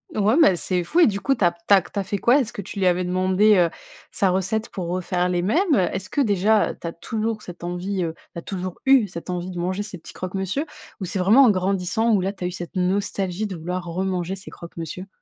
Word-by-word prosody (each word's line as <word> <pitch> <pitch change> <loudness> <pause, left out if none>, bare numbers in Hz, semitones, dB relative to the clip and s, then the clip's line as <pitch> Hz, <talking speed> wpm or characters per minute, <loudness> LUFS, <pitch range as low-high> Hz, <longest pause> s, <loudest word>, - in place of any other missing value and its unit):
Ouais 215 +6 +3
mais 195 - +6
c'est 180 0 -1
fou 350 - +2
et - - +7
du 200 -2 -1
coup, 270 +5 +1
tu - - -2
as 175 - +5
tu 170 +3 0
as 195 - +7
tu 190 +4 -6
as - - -1
fait 200 +1 -3
quoi? 245 +8 +4
Est-ce 240 -3 -2
que - - -5
tu 195 +1 -7
lui 185 - +3
avais 180 0 +2
demandé, 185 +4 +3
heu, 175 -2 +4 0.4
sa 195 - +1
recette 195 +4 -1
pour 180 -3 -5
refaire 180 0 -1
les 180 -1 0
mêmes? 310 - +2
Est-ce 190 0 -1
que 285 - 0
déjà 210 -1 +2
tu 170 - -7
as 165 - -4
toujours 220 +4 -3
cette 175 -1 -10
envie, 180 +2 -2
heu, 160 - -3 0.2
tu 170 - -5
as - - -8
toujours 185 0 -5
eu 265 -5 +5
cette 170 0 -8
envie 180 0 -3
de 175 - -6
manger 185 +3 -2
ces 205 -3 -8
petits 165 - -12
croque-monsieur? 190 - -3 0.4
Ou 185 - -2
c'est 190 - -3
vraiment 215 +9 +6
en 240 - +6
grandissant 195 +4 0
où 195 - +3
là, 195 +2 -1
tu 190 -3 -6
as - - +1
eu - - -4
cette 175 +1 -7
nostalgie 190 +1 -1
de 190 -3 -6
vouloir 180 +2 -4
remanger 185 +1 -2
ces 190 - -10
croque-monsieur? 170 +2 -8
190 Hz, 255 wpm, -23 LUFS, 180-205 Hz, 0.4 s, et